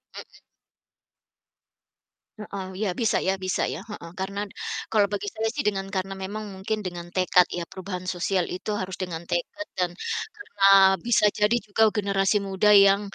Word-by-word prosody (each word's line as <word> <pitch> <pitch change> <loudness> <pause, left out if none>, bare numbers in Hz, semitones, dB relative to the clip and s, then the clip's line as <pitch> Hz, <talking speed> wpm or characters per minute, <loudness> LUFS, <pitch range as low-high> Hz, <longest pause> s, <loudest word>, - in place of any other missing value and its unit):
Mhm. - - -11 2.0
Heeh, 200 -2 -6
iya. 210 -2 0
Bisa 225 - +2
ya 190 - +3
bisa 185 - 0
ya, - - -4
heeh. 170 -5 -8
Karena 195 +1 -3
d - - -17 0.4
kalau 210 -2 +4
bagi 205 0 -3
saya 220 0 -1
sih - - -3
dengan 195 -2 -1
karena 190 +1 -2
memang 210 +3 -5
mungkin 215 +3 -3
dengan 175 -1 -5
tekad 180 -1 +4
ya, 175 - -3
perubahan 185 -1 -7
sosial 180 0 0
itu 185 +4 -4
harus 185 0 -4
dengan 175 -4 -5
tekad 240 - -3
dan 180 -1 0 0.4
karena 305 - -7 0.4
bisa 215 -3 +4
jadi 210 +3 +3
juga 215 +2 +2
generasi 200 -1 +1
muda 195 +2 +3
yang 200 0 +7
195 Hz, 160 wpm, -25 LUFS, 185-210 Hz, 2.0 s, yang